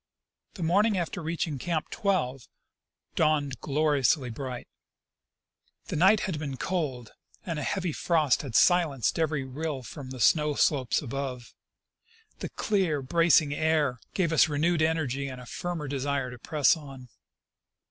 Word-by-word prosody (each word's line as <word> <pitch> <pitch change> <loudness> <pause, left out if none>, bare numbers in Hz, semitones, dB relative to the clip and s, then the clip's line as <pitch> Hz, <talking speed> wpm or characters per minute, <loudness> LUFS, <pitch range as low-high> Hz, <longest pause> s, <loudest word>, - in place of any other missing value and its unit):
The 180 - -5
morning 200 +5 +3
after 175 +1 -3
reaching 160 -3 -3
Camp 160 +2 -2
12 135 - -1 0.7
dawned 150 -4 +1
gloriously 145 -3 +1
bright 125 0 -6 1.2
The - - -2
night 190 +6 +5
had 180 -7 -3
been 140 -3 -4
cold, 135 -11 -3 0.3
and 165 -4 -3
a - - -3
heavy 185 0 -1
frost 155 -6 +2
had 130 -6 -7
silenced 165 - +3
every 155 -3 0
rill 140 +1 -4
from 135 +1 -9
the 130 -1 -8
snow 150 +4 +3
slopes 135 -5 +1
above. 130 -1 -5 0.9
The - - -5
clear, 180 -9 0
bracing 165 0 +3
air 150 -5 +1 0.2
gave 170 -4 +1
us 155 -1 +5
renewed 155 +3 +1
energy 145 -4 0
and 130 -2 -7
a 125 - -10
firmer 170 +2 -4
desire 135 -1 -2
to 125 - -10
press 150 +4 +3
on. 135 -5 -11
150 Hz, 140 wpm, -28 LUFS, 135-165 Hz, 1.2 s, night